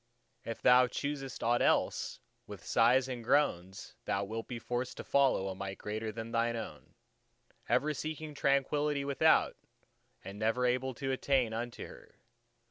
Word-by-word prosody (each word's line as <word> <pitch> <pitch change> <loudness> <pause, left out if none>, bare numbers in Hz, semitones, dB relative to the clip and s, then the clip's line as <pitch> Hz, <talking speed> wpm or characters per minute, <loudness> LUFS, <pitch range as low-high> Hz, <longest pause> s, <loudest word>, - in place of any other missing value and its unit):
If 115 - -6
thou 125 0 +6
choosest 135 0 -4
aught 120 +1 +2
else, - - +1 0.3
with - - -10
sighs 125 +3 +4
and 125 -3 -5
groans 95 -8 0
thou 100 - 0
wilt 110 +3 -5
be 120 - -5
forced 120 +2 -4
to - - -6
follow 135 -8 +2
a 95 - -3
Might 95 0 -6
greater 110 +1 -4
than 115 +1 -7
thine 115 0 +1
own, 115 - -8 0.7
ever 150 +2 +2
seeking 155 +1 -5
Tranquillity 140 +1 +1
without, 140 -2 +3 0.7
and 100 +1 -8
never 115 +3 +1
able 125 +1 0
to 135 0 -3
attain 130 -3 +1
unto 120 +1 -5
her. - - -14
125 Hz, 150 wpm, -32 LUFS, 115-135 Hz, 0.7 s, thou